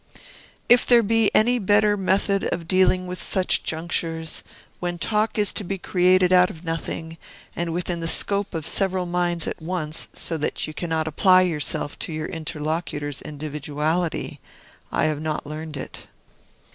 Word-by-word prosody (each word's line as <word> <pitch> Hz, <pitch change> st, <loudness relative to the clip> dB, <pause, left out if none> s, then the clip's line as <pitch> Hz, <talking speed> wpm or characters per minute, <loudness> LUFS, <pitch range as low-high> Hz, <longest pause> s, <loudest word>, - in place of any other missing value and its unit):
If 245 Hz, 0 st, +6 dB
there 240 Hz, -2 st, +5 dB
be 225 Hz, 0 st, +3 dB
any 245 Hz, +3 st, +4 dB
better 205 Hz, +1 st, +3 dB
method 195 Hz, 0 st, +1 dB
of 170 Hz, -1 st, -3 dB
dealing 185 Hz, 0 st, +3 dB
with 180 Hz, 0 st, -5 dB
such 185 Hz, -1 st, +1 dB
junctures, 165 Hz, 0 st, -2 dB, 0.4 s
when 175 Hz, -1 st, -3 dB
talk 215 Hz, +5 st, 0 dB
is 205 Hz, -2 st, +3 dB
to -, -, 0 dB
be 195 Hz, +1 st, -3 dB
created 185 Hz, 0 st, +3 dB
out 180 Hz, 0 st, +6 dB
of 160 Hz, -, -11 dB
nothing, 165 Hz, 0 st, -4 dB, 0.4 s
and 170 Hz, -1 st, -2 dB
within 175 Hz, 0 st, -2 dB
the 165 Hz, -, -3 dB
scope 200 Hz, +2 st, +2 dB
of 160 Hz, -2 st, -3 dB
several 190 Hz, 0 st, 0 dB
minds 175 Hz, -1 st, -1 dB
at -, -, -5 dB
once, 160 Hz, -2 st, -2 dB
so 165 Hz, -, -1 dB
that 150 Hz, -, -1 dB
you 155 Hz, -, -7 dB
cannot 160 Hz, -1 st, -2 dB
apply 185 Hz, +4 st, +5 dB
yourself 150 Hz, -4 st, -2 dB
to -, -, -4 dB
your 155 Hz, 0 st, -3 dB
interlocutor's 155 Hz, -2 st, -4 dB
individuality, 150 Hz, +2 st, -3 dB, 0.5 s
I -, -, +1 dB
have 155 Hz, -1 st, -1 dB
not 155 Hz, -1 st, -3 dB
learned 155 Hz, 0 st, -6 dB
it. -, -, -8 dB
175 Hz, 160 wpm, -23 LUFS, 160-185 Hz, 0.5 s, If